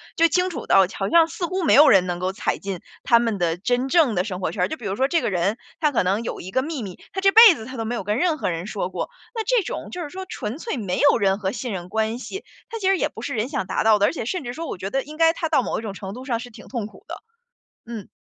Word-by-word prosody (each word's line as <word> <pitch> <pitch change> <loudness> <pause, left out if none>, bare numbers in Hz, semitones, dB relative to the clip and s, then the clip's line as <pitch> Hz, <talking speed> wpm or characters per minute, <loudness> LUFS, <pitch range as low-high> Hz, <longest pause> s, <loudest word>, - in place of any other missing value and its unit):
就 335 - +5
清 360 +3 +1
楚 - - -6
到 195 -1 +6
好 195 - -1
像 335 -1 +5
似 340 +2 -4
乎 370 +1 -2
没 315 - +4
有 295 +1 +8
人 190 -2 +5
能 175 -1 -3
够 185 +1 -1
踩 195 - -2
进 195 -3 -5 0.2
他 235 - +5
们 230 -4 0
的 170 -1 0
真 245 +7 0
正 300 -5 +4
的 180 - +1
生 185 -3 -5
活 185 - -2
圈 190 - -4
儿。 - - -3
就 315 - -5
比 235 - -10
如 195 0 -2
说 265 +5 +2
这 335 +3 +2
个 215 - -2
人， 190 +4 0 0.2
他 305 -2 +2
可 250 - +1
能 195 +5 0
有 - - -5
一 185 - -8
个 260 - +1
秘 290 -3 -4
密， 190 -3 -8
他 385 - -3
这 390 0 +5
辈 445 -3 +9
子 220 - -9
他 260 +2 -8
都 225 - -3
没 230 +2 -3
有 230 - -4
跟 210 +5 -1
任 325 -1 +2
何 - - -1
人 170 +3 -4
说 200 -4 -3
过， - - -4 0.2
那 450 -2 -2
这 470 -1 +2
种 - - -5
就 355 - -5
是 295 - -7
说 380 0 -7
纯 235 +8 -5
粹 450 - -4
没 195 -6 -2
有 285 - +5
任 195 -2 +1
何 190 -2 -1
信 245 -1 -4
任 180 -1 -6
关 220 +3 -1
系。 385 +9 -7 0.2
它 455 - -5
其 390 -4 -1
实 390 - +4
也 - - +1
不 225 - -10
是 - - -3
人 235 +2 -1
想 275 -9 -2
达 190 - -1
到 220 -1 +5
的， 205 - +3
而 - - +1
且 270 - -4
甚 360 +6 -3
至 245 -1 -5
说 330 +4 -6
我 - - -5
觉 190 +2 -5
得 270 - +1
应 305 +2 -11
该 325 0 +5
他 325 -1 -3
到 280 -5 +3
某 - - -2
一 - - -6
种 210 -3 -6
程 195 0 -7
度 250 +3 -8
上 245 -4 -2
是 245 +1 -9
挺 - - -13
痛 235 -5 -4
苦 205 -2 -13
的。 - - -6 0.7
嗯， 230 -4 -7
235 Hz, 345 characters per minute, -23 LUFS, 195-320 Hz, 0.7 s, 辈